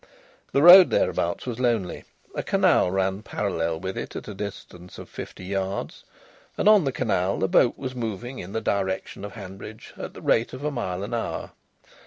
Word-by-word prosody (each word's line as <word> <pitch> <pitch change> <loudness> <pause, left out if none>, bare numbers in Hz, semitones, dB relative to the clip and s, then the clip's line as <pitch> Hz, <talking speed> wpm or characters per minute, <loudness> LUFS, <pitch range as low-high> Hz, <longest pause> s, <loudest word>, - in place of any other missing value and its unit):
The 140 - +2
road 180 +2 +11
thereabouts 85 - 0
was 125 -2 -4
lonely. 115 -7 -1 0.3
A - - -2
canal - - +3
ran 95 +1 0
parallel 85 -7 -2
with 95 +2 -4
it - - -7
at - - -6
a 105 - -6
distance 95 -3 -8
of - - -9
fifty 90 - -9
yards, 95 0 -4 0.5
and - - +1
on 210 -6 +7
the 135 - +1
canal 100 -8 0
a - - +3
boat 120 +6 +3
was 130 - -5
moving 120 +1 -5
in 90 - -8
the 110 - -2
direction 95 -2 -2
of 105 - -7
Hanbridge 100 +1 -10
at - - -7
the - - -10
rate 115 +1 +2
of 130 +2 -7
a 150 - -1
mile 95 -8 -3
an 110 +4 -5
hour. 115 - -3
100 Hz, 190 wpm, -25 LUFS, 95-120 Hz, 0.5 s, road